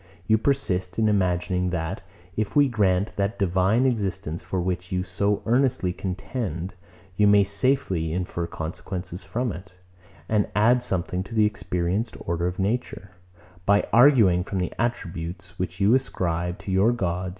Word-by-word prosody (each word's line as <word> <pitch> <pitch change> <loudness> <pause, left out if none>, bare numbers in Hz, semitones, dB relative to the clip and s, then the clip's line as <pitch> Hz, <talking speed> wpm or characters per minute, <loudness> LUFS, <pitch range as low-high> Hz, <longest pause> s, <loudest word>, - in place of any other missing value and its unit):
You 110 +1 +3
persist 95 -10 0
in 110 -1 +3
imagining, 90 -2 +1
that, 80 -2 -3 0.3
if 110 -2 -2
we 145 -1 +6
grant 100 -4 +1
that 100 +2 -1
divine 95 +6 +2
existence, 100 -9 -1
for 90 +1 -3
which 90 0 -3
you 90 0 0
so 100 +3 -1
earnestly 120 -6 +2
contend, 95 -1 -4 0.4
you 105 - +5
may 100 0 +6
safely 100 - +1
infer 85 -1 -3
consequences 90 +3 -6
from 115 +5 -2
it, 90 +1 -10 0.5
and 105 -2 +1
add 120 +4 +4
something 90 -5 -2
to 115 - -8
the 110 -1 +5
experienced 100 +1 -2
order 85 +1 -1
of 90 - -4
nature, 100 -1 -2 0.6
by 100 +1 +4
arguing 115 -9 +6
from 95 - -4
the 90 -1 -2
attributes 90 -4 -4
which 90 0 -3
you 100 +3 +4
ascribe 90 -9 -1
to 95 - -6
your 95 +5 +4
gods. 90 -4 -2
95 Hz, 150 wpm, -25 LUFS, 90-110 Hz, 0.6 s, we